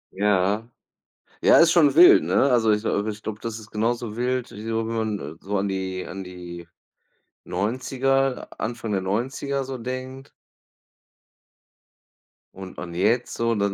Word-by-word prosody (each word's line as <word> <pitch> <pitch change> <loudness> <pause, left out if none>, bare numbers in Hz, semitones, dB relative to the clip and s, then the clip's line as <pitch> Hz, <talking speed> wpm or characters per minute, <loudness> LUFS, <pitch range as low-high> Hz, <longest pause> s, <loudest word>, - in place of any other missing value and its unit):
Ja. 105 +3 +1 0.7
Ja - - +6
ist 165 0 +6
schon 150 -6 +5
wild, 175 +3 +8
ne? 85 +4 -2 0.2
Also, 115 -3 +3
ich, 105 +1 0
äh 105 -1 0
ich 105 0 -6
glaube, 110 -1 -5
das 115 -1 -5
ist 105 -1 -13
genauso 115 0 -1
wild 125 0 -1
wie 105 - -9
so 115 0 -1
wenn 115 - -3 0.2
man 75 -4 -8
so 100 +2 -3
an 100 +1 -1
die 95 -1 -3
an 95 0 -6
die 90 -2 -9 0.8
90er, 135 +4 -1
Anfang 115 -1 -4
der 100 - +1
90er 135 +7 -2
so 130 0 -5
denkt. 130 +3 -6 2.3
Und 95 -1 -9
an 85 -1 -7
jetzt 110 +8 +1
so 115 0 0
dann, 100 -1 0
110 Hz, 155 wpm, -24 LUFS, 95-125 Hz, 2.3 s, wild